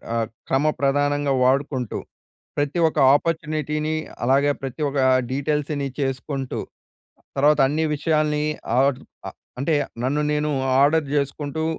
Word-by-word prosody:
ఆహ్, 115 -1 0 0.2
క్రమప్రధానంగా 145 0 +1
వాడుకుంటూ, 130 -2 0 0.6
ప్రతి 145 +4 0
ఒక్క 155 - -2 0.2
ఆపర్చునిటీని, 155 -1 -1 0.3
అలాగే 140 +3 +3
ప్రతి 135 +2 -6
ఒక్క 140 0 -2 0.3
డీటెయిల్స్‌ని 145 +1 -1
చేసుకుంటూ, 135 0 -3 0.8
తర్వాత 150 +1 +4
అన్ని 155 +3 0
విషయాల్ని 150 0 +1 0.4
ఆర్డర్ 135 -1 +1 0.2
ఆహ్, - - -11 0.2
అంటే 155 +3 +1 0.3
నన్ను 145 +3 +1
నేను 150 0 0 0.3
ఆర్డర్ 150 +1 +3
జేసుకుంటూ, 145 +2 -2
145 Hz, 105 wpm, -23 LUFS, 135-150 Hz, 0.8 s, తర్వాత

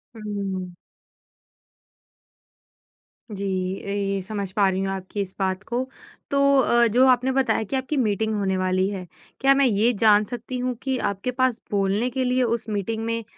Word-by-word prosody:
हुँ। 200 -4 -4 2.6
जी, 200 -2 -5 0.4
ए 200 -1 -1
समझ 200 -1 -5
पा 200 0 +3
रही 190 0 -1
हूँ 195 - -1
आपकी 190 +2 -5
इस 190 -1 -5
बात 190 0 -1
को 240 +4 -2 0.5
तो 280 - +1 0.2
अ, 235 -1 +4
जो 250 +4 +4
आपने 255 +1 +3
बताया 265 -4 +1
कि 220 - -4
आपकी 265 +3 -2
मीटिंग 220 -2 0
होने 195 -2 0
वाली 185 0 +1
है। 190 -3 -5 0.3
क्या 275 0 +5
मैं 275 - +4
ये 225 0 +3
जान 210 -2 +6
सकती 245 +2 -5
हूँ 250 0 -2
कि 265 -1 0
आपके 200 +6 -4
पास 255 -2 0
बोलने 200 +4 +1
के 260 +1 -2
लिए 250 0 +1
उस 230 -1 -1
मीटिंग 215 +2 -2
में 230 0 -2
215 Hz, 165 wpm, -24 LUFS, 195-250 Hz, 2.6 s, जान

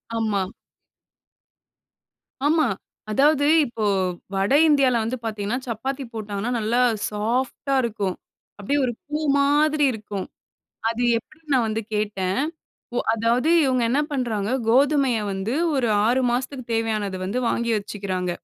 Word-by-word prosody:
ஆமா. 210 -4 0 2.0
ஆமா. 310 -2 +3 0.4
அதாவது 285 +5 +3 0.2
இப்போ 230 -3 -5 0.5
வட 195 +7 +1
இந்தியால 275 -5 +4
வந்து 245 +3 -2
பார்த்தீங்கன்னா, 215 +1 -2
சப்பாத்தி 265 +5 -3
போட்டாங்கன்னா 210 +1 -3
நல்லா 225 +3 +1 0.3
சாஃப்ட்டா 245 +6 -1
இருக்கும். 205 -5 -2 0.4
அப்பிடியே 245 +8 0
ஒரு 240 - -2
பூ 300 +1 -2 0.2
மாதிரி 295 +1 +3
இருக்கும். 205 -3 -5 0.6
அது 230 +1 -2
எப்பிடின்னு 310 +6 -7
நான் 245 -3 +3
வந்து 220 +1 -2
கேட்டேன். 205 0 -1 0.6
ஒ - - +2 0.2
அதாவது 235 +6 +1 0.2
இவுங்க 255 -2 +2
என்ன 275 - +2
பண்றாங்க, 225 -6 -1 0.2
கோதுமைய 270 0 +3
வந்து 195 +4 -3 0.2
ஒரு 255 -4 +1 0.2
6 250 +3 +3
மாசத்துக்கு 255 +1 -2
தேவையானத 215 -4 -1
வந்து 200 +7 -2
வாங்கி 235 0 0
வச்சுக்கிறாங்க. 195 -3 -3
235 Hz, 120 wpm, -23 LUFS, 210-270 Hz, 2.0 s, இந்தியால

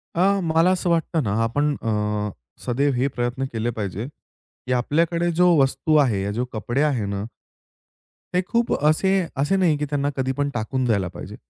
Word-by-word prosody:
अ, 195 +3 +3
मला 165 +2 +3
असं 180 -1 0
वाटतं 165 -2 +1
ना, 100 - -1
आपण 145 +6 +1
अ, 115 - -2 0.8
सदैव 140 +3 +1
हे 125 +3 +1
प्रयत्न 120 +2 -1
केले 115 +1 -1
पाहिजे 100 +2 -3
की 130 -3 -9
आपल्याकडे 165 +7 +1
जो 180 0 +6
वस्तू 145 +3 +1
आहे 110 -7 0
या 100 - -2
जो 125 - 0
कपडे 120 +5 -1
आहे 140 -8 +1
ना 100 0 -3 1.1
ते 180 - +3
खूप 235 0 +1
असे 155 +6 +3 0.3
असे 145 +8 +1
नाही 175 -6 +3
की 150 - -2
त्यांना 145 -1 0
कधीपण 135 +2 -1
टाकून 125 +3 -2
जायला 100 -6 +1
पाहिजे. 90 - -9
140 Hz, 170 wpm, -23 LUFS, 120-165 Hz, 1.1 s, जो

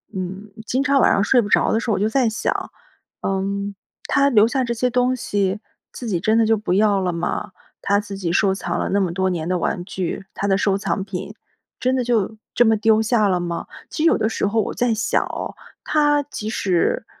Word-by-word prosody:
嗯， 190 +3 -5 0.2
经 260 +2 0
常 280 -1 +3
晚 - - +5
上 200 - +2
睡 245 +3 +4
不 205 - -5
着 - - +3
的 220 - +2
时 230 -1 -2
候， - - +2
我 - - -2
就 215 +2 +1
在 255 0 +2
想， 220 - -2 0.5
嗯， 200 +1 -2 0.3
他 280 0 +3
留 215 -1 +5
下 260 +2 0
这 235 -1 -1
些 250 +2 0
东 250 +1 +2
西， 205 -4 -1 0.3
自 245 - -7
己 185 -6 0
真 220 +5 +2
的 225 - +4
就 225 - +3
不 205 -3 -2
要 205 0 +3
了 180 -2 -1
吗？ 175 +4 -3 0.3
他 200 0 +2
自 200 -1 -7
己 175 -4 -2
收 195 +1 +2
藏 175 -3 -3
了 - - -1
那 200 - +2
么 185 -3 0
多 190 +1 0
年 170 -2 -3
的 180 -1 0
玩 175 +2 -2
具， 190 -1 -4
他 200 - -2
的 195 - +3
收 200 -1 +1
藏 195 -1 -2
品， 195 +2 -6 0.5
真 255 +1 +2
的 - - +1
就， 220 -2 0 0.2
这 240 - +5
么 220 -1 +4
丢 220 0 +3
下 220 -1 +2
了 180 -2 +1
吗？ 170 -1 -4 0.2
其 310 - -3
实 - - +5
有 - - +4
的 220 - 0
时 205 - -1
候 220 +2 +1
我 - - -3
在 240 -2 +1
想 215 - +1
哦， - - -5 0.3
他 295 -1 +2
即 220 -6 -7
使， 185 -6 0
210 Hz, 250 characters per minute, -21 LUFS, 190-235 Hz, 0.5 s, 晚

